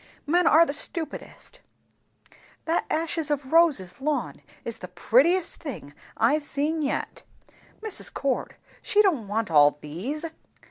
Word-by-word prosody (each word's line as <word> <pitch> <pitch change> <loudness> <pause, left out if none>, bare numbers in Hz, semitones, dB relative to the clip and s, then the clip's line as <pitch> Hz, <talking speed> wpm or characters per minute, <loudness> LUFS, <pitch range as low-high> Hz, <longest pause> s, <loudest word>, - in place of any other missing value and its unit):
Men 340 +3 +3
are 330 +2 +7
the 280 - -3
stupidest! 320 +2 -1 0.5
" - - -26
"That 330 +1 0
ashes 325 -1 -1
of 280 -2 -2
roses 300 - +3
lawn 290 -3 -2 0.2
is 230 - -4
the 180 - -7
prettiest 270 - +2
thing 255 - -8 0.2
I've 285 +8 +3
seen 295 +2 -1
yet. 280 - -3 0.6
Mrs. 435 -3 -4
Cord, 275 -2 -2 0.3
she 420 0 +3
don't 300 - +1
want 210 -2 -2
all 145 -1 +5
these?" 215 - -5
290 Hz, 135 wpm, -25 LUFS, 225-325 Hz, 0.6 s, are